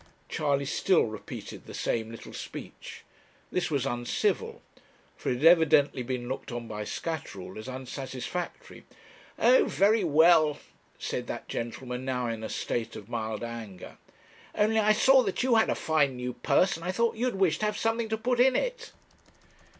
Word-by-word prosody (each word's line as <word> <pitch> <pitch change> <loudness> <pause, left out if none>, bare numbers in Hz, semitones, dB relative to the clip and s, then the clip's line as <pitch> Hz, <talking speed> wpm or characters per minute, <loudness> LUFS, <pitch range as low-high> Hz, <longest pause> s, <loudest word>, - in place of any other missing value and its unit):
Charley 140 -2 0
still 175 +5 +3
repeated 110 -2 -7
the - - -8
same 110 -1 -1
little 115 - -10
speech. - - -9 0.5
This 180 -1 0
was 140 -5 0
uncivil; 120 0 -1 0.5
for - - -4
it 125 - +1
had 135 +6 -1
evidently 160 -5 +5
been 125 0 -4
looked 130 0 -5
on 120 -1 -5
by 105 -1 -5
Scatterall 100 - -5
as 110 +3 -8
unsatisfactory. 130 +5 -6 0.5
'Oh, - - +5
very 210 +2 +3
well,' 155 -1 +5 0.4
said - - -4
that - - -6
gentleman, 125 +2 -5
now 125 -2 -1
in 115 -1 -3
a - - -4
state 115 -2 -3
of 105 +1 -10
mild 110 -2 -3
anger 115 -6 -8 0.6
'only 220 +1 +3
I 215 0 +4
saw 265 +5 +6
that 205 0 -1
you 255 -1 +3
had 220 -1 +4
a - - +1
fine 145 -4 +1
new 125 0 -4
purse, 190 +9 +2
and 165 - -11
I 180 - -1
thought 230 +4 +1
you'd 245 0 -1
wish 185 -5 +2
to 215 - 0
have 210 - -2
something 225 0 0
to 220 - 0
put 245 +2 0
in 255 +1 +5
it.' - - -2
150 Hz, 170 wpm, -28 LUFS, -, 0.6 s, saw